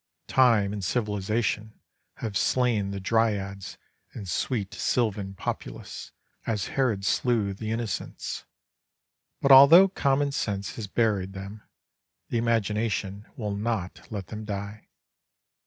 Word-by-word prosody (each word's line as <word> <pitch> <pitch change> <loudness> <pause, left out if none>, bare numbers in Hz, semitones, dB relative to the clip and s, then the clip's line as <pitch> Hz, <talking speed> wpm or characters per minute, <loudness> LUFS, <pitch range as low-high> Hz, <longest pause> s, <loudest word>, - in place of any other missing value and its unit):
Time 115 -6 +3
and 100 -2 -4
civilization 105 +1 -1 0.4
have 110 -3 -5
slain 115 -3 +2
the 100 0 -4
dryads 100 -2 -1 0.4
and 100 -4 -7
sweet 100 +2 -2
sylvan 100 -3 -1
populace, - - -6 0.4
as 105 -4 -1
Herod 115 -8 0
slew 110 -5 +1
the 110 +3 -6
innocents. 115 -1 -4 1.0
But 140 - +4
although 145 +8 +10
common 140 -5 +1
sense 100 -7 -3
has 110 -3 -4
buried 100 -3 0
them, 100 +2 -8 0.7
the 120 - 0
imagination 105 -2 -1
will 105 -3 -3
not 105 -3 -3
let 100 -4 -5
them 110 0 -6
die. 100 0 -6
105 Hz, 115 wpm, -27 LUFS, 100-115 Hz, 1.0 s, although